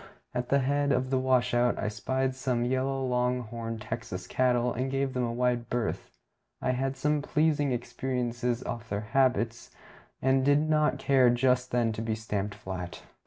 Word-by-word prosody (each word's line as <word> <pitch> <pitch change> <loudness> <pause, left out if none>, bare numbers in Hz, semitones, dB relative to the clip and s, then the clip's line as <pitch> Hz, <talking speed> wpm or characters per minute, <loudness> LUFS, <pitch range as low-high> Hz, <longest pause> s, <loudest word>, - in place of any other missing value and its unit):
At 125 0 -2
the 140 - +4
head 140 +1 +1
of 130 0 0
the 130 - +3
washout 125 -2 +2
I 105 - -2
spied 130 +5 -1
some 130 -2 -1
yellow 130 +1 0
long 125 0 +1
horned 115 -1 -6
Texas 110 -5 -5
cattle, 125 +2 +1
and 130 +3 -2
gave 135 0 -1
them 125 - -1
a 120 - -1
wide 120 -1 0
berth. 120 -3 -2 0.5
I - - -1
had - - -1
had 135 +1 -1
some 150 +2 +1
pleasing 150 -1 +1
experiences 125 -1 -2
of 115 -1 -5
their 100 +1 -1
habits, 125 -3 +1 0.5
and 130 0 +2
did 145 +3 +3
not 155 -1 +2
care 130 -3 +4
just 125 +1 +2
then 120 -2 +1
to 110 - -4
be 110 -1 -1
stamped 105 -2 -3
flat. 90 -5 -6
125 Hz, 175 wpm, -29 LUFS, 115-130 Hz, 0.5 s, the